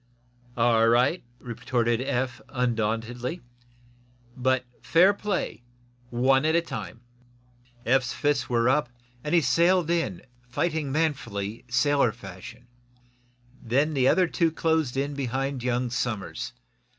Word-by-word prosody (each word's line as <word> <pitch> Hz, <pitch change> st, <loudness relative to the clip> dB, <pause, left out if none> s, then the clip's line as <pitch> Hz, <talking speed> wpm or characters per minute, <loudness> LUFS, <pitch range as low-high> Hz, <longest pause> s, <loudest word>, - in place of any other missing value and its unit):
"All 115 Hz, -1 st, +4 dB
right," 125 Hz, +9 st, +3 dB
retorted 120 Hz, -1 st, -1 dB
Eph, 130 Hz, -2 st, -2 dB
undauntedly. 120 Hz, +2 st, -2 dB, 1.0 s
"But 130 Hz, 0 st, +1 dB, 0.2 s
fair 180 Hz, +5 st, +5 dB
play 200 Hz, -, -3 dB, 0.5 s
one 130 Hz, +3 st, +3 dB
at 160 Hz, +1 st, +2 dB
a 170 Hz, -, +4 dB
time." 120 Hz, -, -7 dB, 0.8 s
Eph's 130 Hz, +1 st, +2 dB
fists 145 Hz, 0 st, 0 dB
were 120 Hz, -1 st, +2 dB
up, 130 Hz, -1 st, +2 dB, 0.3 s
and 150 Hz, +3 st, 0 dB
he 170 Hz, -, +5 dB
sailed 170 Hz, +6 st, +3 dB
in, 160 Hz, -, -1 dB, 0.3 s
fighting 155 Hz, +2 st, -1 dB
manfully, 120 Hz, -9 st, -2 dB
sailor 130 Hz, 0 st, +3 dB
fashion. 95 Hz, -4 st, -11 dB, 1.0 s
Then 140 Hz, +6 st, +1 dB
the 130 Hz, -3 st, +3 dB
other 185 Hz, +5 st, +4 dB
two 165 Hz, -1 st, +1 dB
closed 160 Hz, -5 st, 0 dB
in 140 Hz, +1 st, -1 dB
behind 135 Hz, 0 st, -2 dB
young 125 Hz, 0 st, -1 dB
Somers. 120 Hz, -2 st, -3 dB
130 Hz, 115 wpm, -26 LUFS, 120-150 Hz, 1.0 s, fair